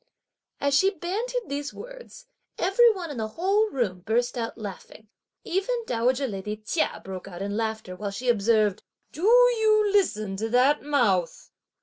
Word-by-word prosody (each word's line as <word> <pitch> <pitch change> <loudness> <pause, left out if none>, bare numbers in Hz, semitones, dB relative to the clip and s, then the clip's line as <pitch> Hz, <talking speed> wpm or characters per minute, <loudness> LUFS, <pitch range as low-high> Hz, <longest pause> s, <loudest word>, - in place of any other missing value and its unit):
As 280 0 0
she 380 +7 +5
bandied 430 +8 -3
these 285 +1 -4
words, - - -11 0.3
every 455 +6 +5
one 355 -7 -6
in 280 - -7
the 220 -1 -2
whole 395 - +1
room 225 - -2
burst 230 +7 -1
out 230 -2 -4
laughing, 215 0 -9 0.4
and - - -7
even 395 +7 +1
dowager 255 - 0
lady 210 0 -5
Chia 215 +10 -2
broke 190 0 -7
out 185 0 -7
in 200 +1 -3
laughter 220 -4 -3
while 205 +2 -4
she 210 +6 -6
observed: 215 -3 +2 0.3
"Do 310 - -9
you 445 -3 +5
listen 215 - +1
to 220 +3 -2
that 255 +5 +3
mouth? 220 - 0
250 Hz, 160 wpm, -26 LUFS, -, 0.4 s, she